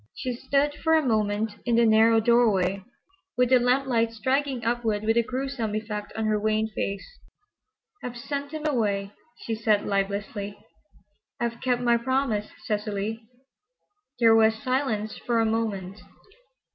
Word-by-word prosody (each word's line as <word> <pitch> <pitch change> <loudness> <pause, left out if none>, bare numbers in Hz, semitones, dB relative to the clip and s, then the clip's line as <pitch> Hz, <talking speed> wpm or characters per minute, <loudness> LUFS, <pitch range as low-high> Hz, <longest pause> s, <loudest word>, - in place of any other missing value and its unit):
She 255 - -3
stood 280 +4 0
for 320 +2 +1
a 315 -2 +2
moment 215 -2 0
in 240 -2 +1
the 235 0 +5
narrow 225 +1 +5
doorway, 210 -5 +2 0.5
with 250 -1 +3
the 255 -1 +6
lamplight 245 -2 +1
striking 260 +1 -1
upward 225 -3 0
with 225 +1 +2
a 235 - +5
gruesome 250 -3 -3
effect 210 -1 -4
on 220 - -2
her 215 -1 +1
wan 215 +1 0
face. 195 0 -3 1.0
"I've 245 -1 -5
sent 280 +3 -4
him 310 -1 -5
away," 205 -8 0 0.3
she 230 - -2
said 215 -2 +1
lifelessly. 200 +1 -2 0.8
"I've 235 0 -3
kept 250 -1 0
my 235 -1 +4
promise, 235 -3 -1 0.2
Cecily." 210 +1 -2 1.0
There 225 -2 +6
was 220 0 +5
silence 250 -4 -2
for 235 -1 0
a 225 - +3
moment. 215 -3 -2
225 Hz, 145 wpm, -26 LUFS, 210-250 Hz, 1.0 s, the